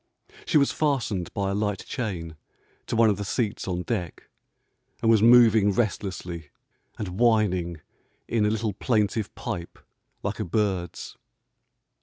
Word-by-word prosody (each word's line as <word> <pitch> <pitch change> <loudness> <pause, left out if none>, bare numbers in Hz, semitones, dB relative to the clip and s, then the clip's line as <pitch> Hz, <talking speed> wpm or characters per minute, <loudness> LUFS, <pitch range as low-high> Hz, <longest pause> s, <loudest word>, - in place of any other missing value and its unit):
She - - +4
was 140 -1 +3
fastened 120 - -1
by 100 -1 -1
a - - -1
light 105 -1 -2
chain 90 - -4 0.5
to - - -2
one 115 -1 +5
of 100 - -2
the 100 - -4
seats 105 0 -2
on 90 -1 -2
deck, 90 -7 -4 0.7
and 115 - +3
was 110 -2 +5
moving 115 -3 +6
restlessly 95 -6 -3 0.5
and 95 -1 -5
whining 95 -8 +2 0.5
in 115 -2 +1
a 105 - +3
little 110 -1 -1
plaintive 105 -1 0
pipe 85 -1 -5 0.5
like - - -3
a - - 0
bird's. 95 -2 -2
105 Hz, 140 wpm, -26 LUFS, 90-115 Hz, 0.7 s, moving